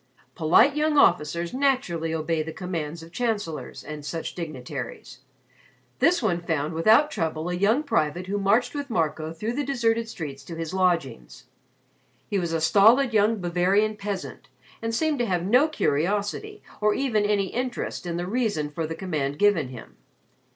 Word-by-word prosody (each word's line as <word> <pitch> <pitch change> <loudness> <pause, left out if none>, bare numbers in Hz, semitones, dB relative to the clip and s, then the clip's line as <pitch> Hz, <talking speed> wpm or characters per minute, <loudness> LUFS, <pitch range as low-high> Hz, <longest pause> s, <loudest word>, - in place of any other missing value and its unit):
Polite 175 - +4
young 300 0 +1
officers 170 - +3
naturally 255 - 0
obey 160 0 -1
the 160 +1 -5
commands 165 -3 -5
of 165 - -13
Chancellors 210 -9 -3
and 150 -1 -7
such 165 +2 -4
dignitaries. 155 -8 -7 0.8
This 340 -4 +3
one 175 -5 +1
found 160 -2 -2
without 220 - +4
trouble 160 - -2
a - - -2
young 210 +10 +2
private 175 - 0
who 200 +2 -2
marched 205 +5 +2
with 285 -1 -4
Marco 160 -5 -1
through 210 +8 -4
the 290 +3 -1
deserted 230 -4 0
streets 140 -9 -7
to 170 - -7
his 165 +1 -5
lodgings. 165 - -1 0.8
He 200 - 0
was 170 -2 -2
a 165 - 0
stolid 225 - +5
young 215 +1 +3
Bavarian 185 +5 +1
peasant 200 -2 -6 0.3
and 225 0 -2
seemed 310 0 0
to 240 - +1
have 180 -3 0
no 250 +9 +4
curiosity 205 - -1 0.2
or 210 0 +3
even 235 -6 +1
any 205 -2 +1
interest 245 -6 -4
in 170 0 -2
the 175 - -2
reason 200 -9 -1
for 160 +1 -3
the 165 - -5
command 150 -6 -3
given 200 -8 +3
him. 115 - -11
185 Hz, 165 wpm, -25 LUFS, 160-230 Hz, 0.8 s, stolid